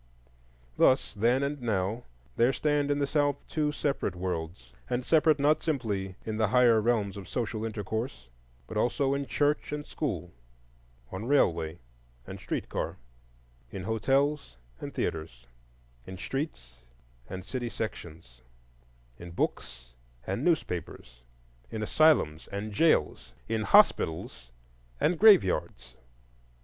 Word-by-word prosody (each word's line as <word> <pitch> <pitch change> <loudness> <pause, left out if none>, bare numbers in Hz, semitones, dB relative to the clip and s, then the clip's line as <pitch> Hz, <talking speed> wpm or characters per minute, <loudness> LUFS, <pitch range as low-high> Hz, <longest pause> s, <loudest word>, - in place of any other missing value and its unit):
Thus, 130 - +3
then 120 +6 +2
and 140 0 -3
now, 110 0 -1 0.3
there 120 +3 +3
stand 145 -1 +1
in 145 - +1
the 145 - +1
South 145 -1 +1
two 150 -2 0
separate 145 -8 -2
worlds; 80 -8 -5 0.2
and 125 0 -1
separate 155 -1 +4
not 150 +2 +3
simply 105 - -2
in 110 -1 -3
the 110 -1 +2
higher 115 0 +5
realms 105 -3 0
of 95 - -9
social 115 -3 -3
intercourse, 110 - -4 0.4
but 105 - -6
also 135 +5 +1
in 140 -1 -2
church 145 +5 0
and 150 0 -4
school, 90 - -4 0.8
on 95 +4 -5
railway 85 - +2 0.5
and - - -8
street - - -4
car, - - -3 0.7
in 95 +3 -6
hotels 135 - 0 0.2
and - - -6
theatres, 80 -7 -4 0.6
in 95 - -7
streets 65 - -5 0.5
and 95 0 -6
city 120 +2 -3
sections, 80 - -7 0.8
in 85 - -9
books 60 -7 -4 0.3
and 95 - -2
newspapers, 85 - -2 0.5
in 110 - -4
asylums 110 - +3
and 100 +2 -5
jails, 160 +9 +2
in 110 -1 -1
hospitals 65 -9 +3 0.5
and 170 +1 +1
graveyards. 95 - +4
110 Hz, 125 wpm, -29 LUFS, 90-140 Hz, 0.8 s, higher